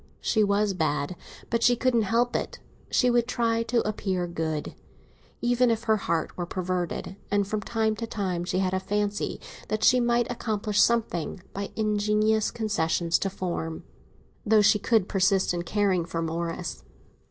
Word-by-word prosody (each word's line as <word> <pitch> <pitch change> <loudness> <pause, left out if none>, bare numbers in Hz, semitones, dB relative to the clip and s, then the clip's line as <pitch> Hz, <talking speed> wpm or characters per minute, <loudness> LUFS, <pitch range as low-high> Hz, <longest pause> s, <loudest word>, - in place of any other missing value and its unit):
She 220 -2 +2
was 200 0 +2
bad; 155 -1 -1 0.4
but 230 0 +1
she 245 +1 +5
couldn't 245 -1 +2
help 240 +2 +2
it. - - -2 0.3
She 250 -1 +3
would 240 -1 +2
try 230 -2 +1
to 230 -1 0
appear 190 -4 -1
good, 160 -3 -3 0.7
even 245 +1 +3
if 225 0 0
her 220 -1 +3
heart 170 -5 -2
were 175 -1 -4
perverted; 185 +1 -3
and 205 -1 +1
from 215 +1 -2
time 220 -1 0
to 230 - -4
time 185 -6 -2
she 180 +1 -2
had 185 0 0
a 190 - +1
fancy 205 +1 -2 0.3
that 215 0 -2
she 250 - +6
might 240 0 +2
accomplish 215 -3 0
something 200 -6 0
by 200 0 -4
ingenious 215 0 +2
concessions 170 -7 0
to 195 - -1
form, 175 -4 -4 0.6
though 215 -1 +4
she 210 0 +4
should 220 -5 +3
persist 190 -1 +2
in 175 - -1
caring 190 0 +1
for 165 -1 -3
Morris. 165 +1 -4
205 Hz, 165 wpm, -26 LUFS, 180-225 Hz, 0.7 s, she